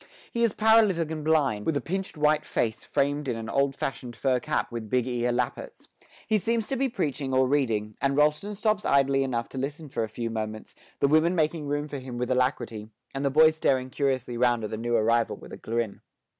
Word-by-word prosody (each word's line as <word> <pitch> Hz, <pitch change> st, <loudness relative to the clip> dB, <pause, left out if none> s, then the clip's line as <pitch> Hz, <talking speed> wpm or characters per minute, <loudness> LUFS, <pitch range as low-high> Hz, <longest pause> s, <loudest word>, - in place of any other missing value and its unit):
He 235 Hz, -, 0 dB
is 230 Hz, -, +2 dB
paralytic 215 Hz, -7 st, +4 dB
and 155 Hz, -1 st, -4 dB
blind, 140 Hz, -10 st, +1 dB
with 160 Hz, -, +2 dB
a -, -, 0 dB
pinched 190 Hz, +1 st, -4 dB
white 150 Hz, 0 st, +3 dB
face 110 Hz, -6 st, -2 dB
framed 145 Hz, +1 st, 0 dB
in 125 Hz, -, -1 dB
an 115 Hz, -1 st, -6 dB
old 140 Hz, +2 st, +1 dB
fashioned 125 Hz, -3 st, -4 dB
fur 130 Hz, +1 st, +1 dB
cap -, -, -2 dB
with 115 Hz, -2 st, -6 dB
big 125 Hz, 0 st, +1 dB
ear 125 Hz, -1 st, 0 dB
lappets; 120 Hz, 0 st, -3 dB, 0.4 s
he 215 Hz, -1 st, +2 dB
seems 225 Hz, +2 st, 0 dB
to 270 Hz, -, 0 dB
be 265 Hz, +1 st, +1 dB
preaching 140 Hz, -, -2 dB
or 130 Hz, 0 st, +4 dB
reading, 115 Hz, -7 st, 0 dB
and 140 Hz, 0 st, +1 dB
Rolleston 150 Hz, +8 st, +2 dB
stops 215 Hz, 0 st, 0 dB
idly 135 Hz, 0 st, +3 dB
enough 120 Hz, -3 st, -2 dB
to 135 Hz, -, -6 dB
listen 150 Hz, +3 st, -4 dB
for 130 Hz, -, -2 dB
a 110 Hz, -, -2 dB
few 115 Hz, +1 st, -4 dB
moments, 110 Hz, -1 st, -5 dB, 0.3 s
the -, -, +5 dB
women 155 Hz, +4 st, +3 dB
making 155 Hz, -2 st, 0 dB
room 145 Hz, +1 st, -1 dB
for 145 Hz, -2 st, -5 dB
him 130 Hz, -2 st, -7 dB
with 125 Hz, +1 st, -2 dB
alacrity, 125 Hz, -4 st, -1 dB, 0.2 s
and 135 Hz, -, -3 dB
the 140 Hz, -, +2 dB
boys 155 Hz, +3 st, +5 dB
staring 130 Hz, -4 st, +1 dB
curiously 130 Hz, -4 st, -1 dB
round 120 Hz, -2 st, +2 dB
at 105 Hz, -, -4 dB
the -, -, -2 dB
new 120 Hz, +1 st, -1 dB
arrival 115 Hz, +1 st, +2 dB
with -, -, -13 dB
a -, -, -6 dB
grin. 115 Hz, -2 st, -3 dB
135 Hz, 220 wpm, -27 LUFS, 120-155 Hz, 0.4 s, the